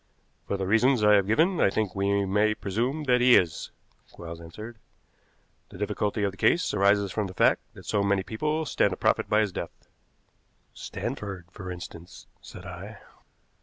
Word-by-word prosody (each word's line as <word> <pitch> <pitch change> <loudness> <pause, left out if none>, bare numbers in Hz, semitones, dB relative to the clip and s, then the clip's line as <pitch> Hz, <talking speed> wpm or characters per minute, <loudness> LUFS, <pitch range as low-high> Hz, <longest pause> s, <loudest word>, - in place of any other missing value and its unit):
"For 100 - -1
the 95 - -2
reasons 115 +4 +3
I 105 0 +6
have 100 -2 +4
given 160 - +2
I - - +5
think 100 -2 -1
we 100 0 +1
may 105 +2 +2
presume 120 +11 -2
that 125 -3 +2
he 125 0 +7
is," 85 -4 +1 0.4
Quarles 85 -1 -9
answered. 110 +7 -10 0.9
"The - - -12
difficulty 105 0 -1
of 100 - +1
the 100 - -16
case 175 - +2
arises 100 -1 +3
from 105 -1 -2
the 95 - -10
fact - - +3
that - - -13
so 105 - 0
many 100 -1 +1
people 155 +10 -2
stand - - +2
to - - -6
profit - - +1
by 105 +1 +4
his 105 -3 0
death." - - -8 0.8
"Stanford, 95 -4 -6
for 95 -1 -8
instance," 90 -1 -10 0.2
said - - -11
I. - - -9
105 Hz, 175 wpm, -27 LUFS, 95-115 Hz, 0.9 s, he